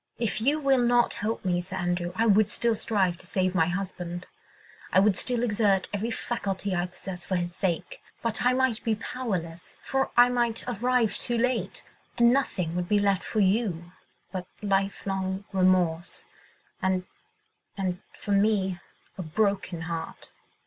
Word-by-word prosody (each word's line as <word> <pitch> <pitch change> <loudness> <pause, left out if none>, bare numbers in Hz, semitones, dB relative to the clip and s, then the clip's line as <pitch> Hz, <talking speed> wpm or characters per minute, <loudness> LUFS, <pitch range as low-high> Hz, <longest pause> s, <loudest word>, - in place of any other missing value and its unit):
If 225 -2 0
you 285 +6 +3
will 275 -3 +3
not 240 0 +3
help 215 0 -3
me, 175 -1 +1
Sir 185 +2 -6
Andrew, 175 -1 -1
I 225 - +2
would 210 -1 +4
still 235 +2 +1
strive 190 -5 0
to 185 - -8
save 185 0 0
my 165 -3 +3
husband. 180 -1 -4 0.7
I 185 - +5
would 200 0 +4
still 240 +5 +1
exert 205 -4 +2
every 210 +3 -1
faculty 200 -4 -2
I 175 0 0
possess 180 0 -7
for 190 - -2
his 175 -1 -2
sake; 180 -3 -2 0.2
but 230 -2 0
I 250 +1 +4
might 255 -3 +1
be 225 -2 +1
powerless, 185 -8 -5
for 270 0 0
I 245 0 +8
might 240 -2 0
arrive 245 -1 +1
too 240 -1 +2
late, 250 0 0 0.3
and 235 0 +6
nothing 185 -11 0
would 180 -1 -2
be 210 - +4
left 200 -2 +2
for 215 - 0
you 190 -4 +1 0.4
but 185 -1 -5 0.2
lifelong 195 -1 -1
remorse, 185 -2 +1 0.6
and... 190 -1 +1 0.7
and... 185 -2 -2
for 205 - -6
me, 195 -3 +2 0.4
a - - -1
broken 190 0 -1
heart." 165 0 -5
195 Hz, 160 wpm, -27 LUFS, 180-230 Hz, 0.7 s, I